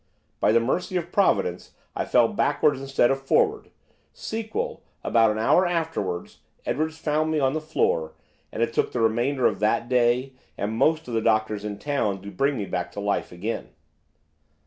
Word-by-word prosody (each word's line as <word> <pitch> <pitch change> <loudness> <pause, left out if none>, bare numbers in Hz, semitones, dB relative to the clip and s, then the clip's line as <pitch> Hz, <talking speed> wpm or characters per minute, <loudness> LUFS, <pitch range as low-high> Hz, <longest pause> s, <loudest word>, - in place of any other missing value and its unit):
By - - +3
the 115 - +5
mercy 175 +10 -1
of 175 0 -4
Providence 90 - +1 0.2
I - - -1
fell - - +4
backwards 135 -3 +1
instead 135 -2 +2
of 135 0 -1
forwards; 425 - +1 0.4
sequel, 225 - -4 0.2
about 115 -1 +4
an 105 - -1
hour 115 +11 +4
afterwards 160 - -3 0.3
Edwards 155 +2 -1
found 155 0 0
me 155 -1 +1
on 135 -1 +2
the 155 - -2
floor, 80 - 0 0.4
and 115 - -1
it 115 - -1
took - - 0
the 125 - -1
remainder 120 +4 +1
of - - +2
that 110 +3 +1
day, 125 +1 +2 0.2
and 105 +2 -2
most 155 +5 +2
of 120 - -6
the 115 - +1
doctors 110 -1 +1
in 105 -1 -4
town, 105 -10 -1
to 100 - -7
bring 140 +3 0
me 105 - -2
back 90 -2 -3
to - - -6
life 100 0 -1
again. 100 +6 -4
125 Hz, 180 wpm, -25 LUFS, 110-155 Hz, 0.4 s, the